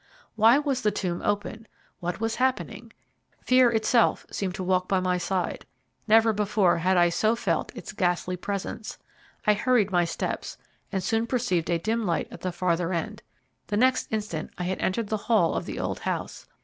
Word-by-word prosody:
Why 225 +3 +6
was 285 -3 -1
the 210 - +3
tomb 180 -4 -3
open? 210 +2 -2 0.3
What 175 -1 -3
was 225 0 -1
happening? 260 +1 -1 0.5
Fear 255 -1 +5
itself 230 +1 +2
seemed 190 -2 -3
to 190 - -4
walk 185 0 +1
by 190 - +2
my 180 -1 0
side. 180 +1 -2 0.4
Never 225 0 +5
before 200 -4 +2
had 185 +2 +2
I 175 0 +5
so 215 +6 +2
felt 235 - -1
its - - -7
ghastly 180 0 0
presence 200 +3 -5 0.5
I 210 - +5
hurried 220 -2 +2
my 175 -1 +3
steps, 170 - -4 0.3
and 190 -2 -2
soon 225 +4 0
perceived 235 -10 0
a 170 - +2
dim 225 +6 -1
light 170 - 0
at - - -10
the 185 - -2
farther 175 0 0
end. 170 -2 -3 0.5
The 205 - -1
next 255 +3 +3
instant 210 -8 -3
I 180 - -3
had 185 +1 -2
entered 205 +3 -1
the 215 - 0
hall 210 -8 +4
of - - -3
the - - -5
old - - -3
house. - - -4
200 Hz, 185 wpm, -26 LUFS, 180-225 Hz, 0.5 s, Why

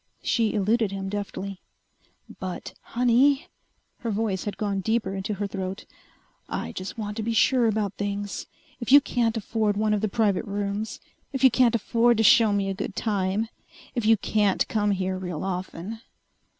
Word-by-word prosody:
She 225 -3 +1
eluded 215 +1 +2
him 195 -1 -4
deftly. 200 -1 -5 0.8
"But, 185 -1 -5
honey!" 265 +7 +2 0.5
Her 235 - -3
voice 205 -3 -1
had 205 - -4
gone 200 -2 -1
deeper 220 -1 0
into 195 +2 -3
her 205 +1 -2
throat. 195 -1 -5 0.6
"I - - -3
just 185 +4 -6
want 210 -1 -4
to - - -1
be 230 +1 -1
sure 245 +1 +4
about 210 -2 0
things. 205 0 -3 0.3
If 235 0 -3
you 285 - +11
can't 235 -4 0
afford 215 -1 0
one 215 0 +2
of 210 - 0
the 215 - 0
private 205 -1 +1
rooms 205 +1 -3 0.3
if 265 - -2
you 260 - +8
can't 240 0 +4
afford 235 +1 +3
to 225 - +3
show 220 0 +6
me 200 -1 +1
a 195 - -1
good 195 0 -5
time 205 0 0 0.5
if 240 - -1
you 220 +1 +5
can't 205 -1 +1
come 210 -2 +1
here 185 -1 -1
real 180 -4 -4
often 190 +3 -4
210 Hz, 175 wpm, -26 LUFS, 195-230 Hz, 0.8 s, you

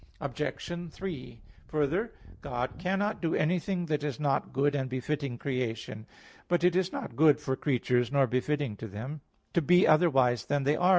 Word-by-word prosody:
Obj. 150 +5 -4
3: 155 - -7 0.3
Further, 160 - 0 0.3
God 125 +3 -3
cannot 195 +4 -1
do 165 -2 +1
anything 175 +3 0
that 150 -2 -1
is 150 -1 -3
not 145 -2 0
good 140 +2 +2
and 135 -2 -1
befitting 130 0 -2
creation. 115 -4 -3 0.4
But 175 -1 +1
it 180 0 +4
is 185 0 +1
not 115 - -5
good 150 +1 +5
for 130 - -1
creatures 125 -3 +1
nor 140 -1 +4
befitting 130 +1 -1
them 110 +8 -6 0.3
to 170 - +3
be 180 +4 +5
otherwise 135 - +4
than 145 -1 0
as - - -5
they 145 +2 +3
are. 180 +3 +3
145 Hz, 170 wpm, -29 LUFS, 130-170 Hz, 0.4 s, good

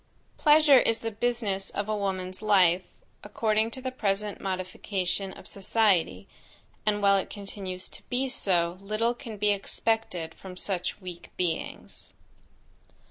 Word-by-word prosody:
Pleasure 295 -2 +7
is 230 -2 +2
the 225 - -2
business 210 -4 -1
of 205 0 -3
a 215 - 0
woman's 185 -2 -3
life, 190 -4 +5 0.4
according 215 +1 +1
to 260 +3 -5
the 260 - -2
present 205 -4 -1
modification 190 0 -2
of - - -12
society, 190 - +1 0.6
and 205 -1 +2
while 200 0 +6
it 190 - -2
continues 195 -2 -6
to - - -12
be 260 +2 0
so, 175 -7 0
little 215 +4 0
can 235 -4 -8
be 205 0 +3
expected 200 -4 -1
from 185 -1 -10
such 185 -1 -2
weak 175 -2 -8
beings. 175 -3 -4
200 Hz, 135 wpm, -28 LUFS, 185-220 Hz, 0.6 s, Pleasure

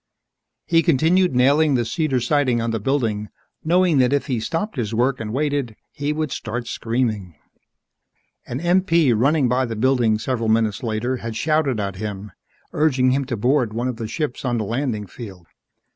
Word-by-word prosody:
He 165 - +1
had 165 - +4
continued 170 +1 +3
nailing 140 +3 +4
the 120 -2 +1
cedar 150 -1 0
siding 125 -1 +1
on 115 0 -1
the 115 - -1
building, 110 -4 -1 0.3
knowing 175 -2 +3
that 125 0 +3
if 145 0 +1
he 130 -5 -1
stopped 165 - -3
his 115 -4 -2
work 130 +3 +1
and 110 -1 -5
waited, 140 -3 -1 0.2
he 145 +1 -3
would 155 -2 -2
start 120 +2 -4
screaming. 115 -7 -2 1.1
An 125 - -4
MP 170 -5 +3
running 140 +4 +2
by 125 +2 +1
the 115 - -4
building 120 -2 +2
several 115 0 -2
minutes 110 -2 +1
later 120 +2 -2
had 115 -2 -6
shouted 145 -2 +1
at 100 -2 -3
him, 105 0 -6 0.4
urging 130 -4 +2
him 135 +1 0
to 125 -3 -3
board 125 0 +1
one 120 +3 -2
of 125 -3 -3
the 115 -2 -4
ships 150 +1 -3
on 120 -2 0
the 110 - -1
landing 115 -2 -2
field. 95 -3 -10
125 Hz, 180 wpm, -21 LUFS, 115-145 Hz, 1.1 s, had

